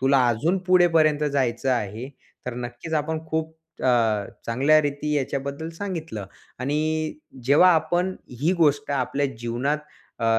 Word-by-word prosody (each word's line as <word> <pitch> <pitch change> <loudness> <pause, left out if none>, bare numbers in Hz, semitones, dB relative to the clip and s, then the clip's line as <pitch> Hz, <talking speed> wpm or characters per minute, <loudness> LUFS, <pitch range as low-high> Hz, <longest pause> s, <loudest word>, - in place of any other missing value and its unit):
तुला 135 -1 +4
अजून 155 +12 +1
पुढेपर्यंत 165 -5 +4
जायचं 130 -1 0
आहे, 115 +2 -3 0.4
तर 125 - -3
नक्कीच 125 +6 -5
आपण 160 +1 -1
खूप 160 0 -2 0.3
अ, - - +1 0.6
चांगल्या 140 +7 +4
रीती 145 +1 -2
याच्याबद्दल 140 +3 -2
सांगितलं. 165 - -5 0.3
आणि 155 +3 -1 0.3
जेव्हा 155 +7 +6
आपण 175 +4 +1 0.3
ही 165 +5 +3
गोष्ट 145 -1 +2
आपल्या 140 +1 0
जीवनात 120 +6 -1 0.4
अ, 115 - -2
145 Hz, 125 wpm, -24 LUFS, 130-160 Hz, 0.6 s, जेव्हा